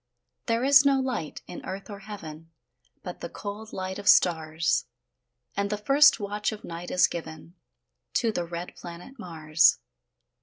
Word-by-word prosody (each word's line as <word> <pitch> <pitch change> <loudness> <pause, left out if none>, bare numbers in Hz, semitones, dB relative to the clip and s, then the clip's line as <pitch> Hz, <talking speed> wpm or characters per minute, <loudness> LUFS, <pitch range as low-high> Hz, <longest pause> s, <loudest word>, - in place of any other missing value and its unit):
There 230 +1 +1
is 280 +1 +7
no 275 -1 +4
light 250 - -3
in - - -9
earth 195 +1 -6
or 205 -2 -8
heaven, 165 -6 -9 0.5
But - - -7
the - - -5
cold 210 +1 -7
light 190 +1 -4
of 205 - -8
stars; 160 -1 +3 0.7
And 200 0 -1
the 210 - -1
first 275 +6 +5
watch 205 +1 -2
of 215 -1 -8
night 170 +1 -7
is 180 - +4
given 160 0 -7 0.6
To 230 -2 +2
the 175 -5 -2
red 170 +1 -6
planet 175 +10 -10
Mars. 160 -4 +3
195 Hz, 155 wpm, -27 LUFS, 170-220 Hz, 0.7 s, is